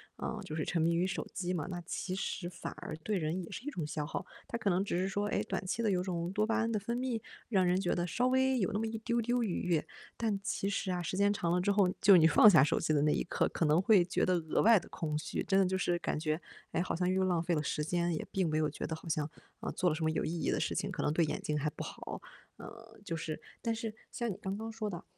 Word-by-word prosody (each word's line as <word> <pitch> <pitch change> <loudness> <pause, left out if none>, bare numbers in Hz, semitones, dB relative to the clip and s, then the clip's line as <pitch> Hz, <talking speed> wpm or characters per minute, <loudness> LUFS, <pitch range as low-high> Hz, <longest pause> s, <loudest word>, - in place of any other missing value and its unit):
啊， 220 - -4
就 155 -4 -5
是 155 - -1
沉 170 - 0
迷 170 +1 +3
于 175 +2 +2
手 185 - -3
机 180 0 -2
嘛， 160 -5 -2
那 175 -2 -4
其 185 +2 -4
实 190 -2 -3
反 175 - -6
而 - - -6
对 195 +6 -2
人 170 +2 -1
也 165 - -10
是 250 - -7
一 - - -1
种 175 - -4
消 150 0 -3
耗。 150 - -4 0.2
它 235 - -3
可 210 - 0
能 185 +1 +2
只 175 - -1
是 185 +2 0
说， 205 +1 -1
诶， - - 0
短 - - -3
期 225 - -1
的 215 - +2
有 180 -2 +1
种 175 -2 -2
多 210 +2 +1
巴 225 - +1
胺 230 0 +1
的 215 - 0
分 235 +4 -3
泌， 250 -3 -2 0.3
让 190 -5 +3
人 180 +1 +2
觉 175 - +1
得 175 0 -1
稍 245 +9 +1
微 260 0 +3
有 195 0 +1
那 205 - -1
么 225 - -1
一 225 0 -4
丢 235 +1 0
丢 240 +1 +1
愉 200 -6 -2
悦， 170 -4 +1 0.3
但 215 -4 -1
其 195 0 -1
实 200 -2 -1
啊， 180 -1 -1
时 180 +2 -3
间 200 +1 +4
长 170 -4 -1
了 180 - +3
之 200 +3 +2
后， 200 -2 +4
就 200 - +7
是 - - +10
你 160 - +6
放 165 +7 +8
下 165 -9 +7
手 150 - +2
机 - - 0
的 145 - +3
那 150 +1 +3
一 - - 0
刻， - - +1
可 165 - 0
能 155 +3 +4
会 200 -2 +6
觉 180 - +1
得 185 - +3
额 160 -3 0
外 225 -1 +7
得 - - -13
空 150 -2 -2
虚。 - - -3 0.3
真 195 -1 +4
的 195 - +5
就 190 +1 0
是 175 -1 +1
感 - - -2
觉， 155 0 -1 0.3
诶， - - 0
好 185 - -1
像 180 +1 0
又 190 0 +2
浪 180 -3 +2
费 170 0 0
了 150 - +1
时 150 +1 -1
间， 175 +2 0
也 155 - -3
并 190 -3 +1
没 155 - 0
有 155 -1 +2
觉 145 - -5
得 160 - -3
好 160 - -12
像， 155 -2 -1 0.3
嗯， - - -3
做 180 - +2
了 155 - 0
什 160 - -3
么 160 - +3
有 - - -1
意 - - -2
义 - - 0
的 - - 0
事 - - -1
情， - - -1
可 - - -3
能 145 - +1
对 170 - +3
眼 - - -3
睛 150 - -1
还 150 - -1
不 - - -7
好。 - - -7 0.4
嗯， - - -9 0.4
就 165 - -3
是 155 -1 -4 0.2
但 230 -2 0
是 225 -1 -4 0.2
像 235 -2 -2
你 185 - -6
刚 195 -2 -4
刚 225 +1 -5
说 220 -1 -3
的， 175 -4 -6
180 Hz, 330 characters per minute, -32 LUFS, 165-210 Hz, 0.4 s, 是